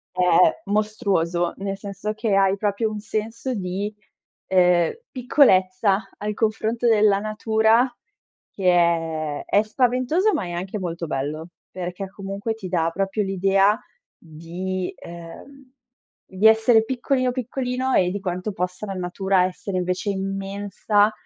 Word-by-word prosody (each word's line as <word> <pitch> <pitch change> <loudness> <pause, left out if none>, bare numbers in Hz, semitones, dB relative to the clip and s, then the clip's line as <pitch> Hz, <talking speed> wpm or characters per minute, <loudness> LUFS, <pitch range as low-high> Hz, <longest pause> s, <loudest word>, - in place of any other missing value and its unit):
è 185 - -2
è 180 0 +4
mostruoso, 195 -5 0
nel 195 0 -3
senso 200 +1 -5
che 215 -2 -1
hai 195 0 +3
proprio 205 +2 -1
un 215 - -5
senso 220 +4 -3
di, 200 +1 -3 0.5
ehm, 180 -2 +3 0.2
piccolezza 200 -6 +3
al 210 +1 -3
confronto 220 +2 0
della 210 -3 +4
natura 220 +3 +2 0.6
che 190 -2 +1
è 165 -3 +1
è 205 - +3
spaventoso, 255 - +1
ma 200 - -1
è 175 - -6
anche 185 +4 -4
molto 170 -2 -4
bello. 150 +4 -4 0.2
Perché 185 +1 -5
comunque 200 +2 -4
ti 210 -4 -7
dà 165 -2 0
proprio 195 +3 -1
l'idea 195 +2 +2 0.4
di 175 +3 -5
ehm, 210 +11 -12 0.6
di 190 +3 -1
essere 220 +1 +5
piccolino, 255 +1 0
piccolino 255 +1 -2
e 180 -1 +3
di 200 - -3
quanto 185 +1 -3
possa 185 +2 -4
la 195 - -5
natura 185 +1 +1
essere 185 +1 -4
invece 180 +3 -1
immensa 200 +2 0
195 Hz, 135 wpm, -23 LUFS, 180-220 Hz, 0.6 s, essere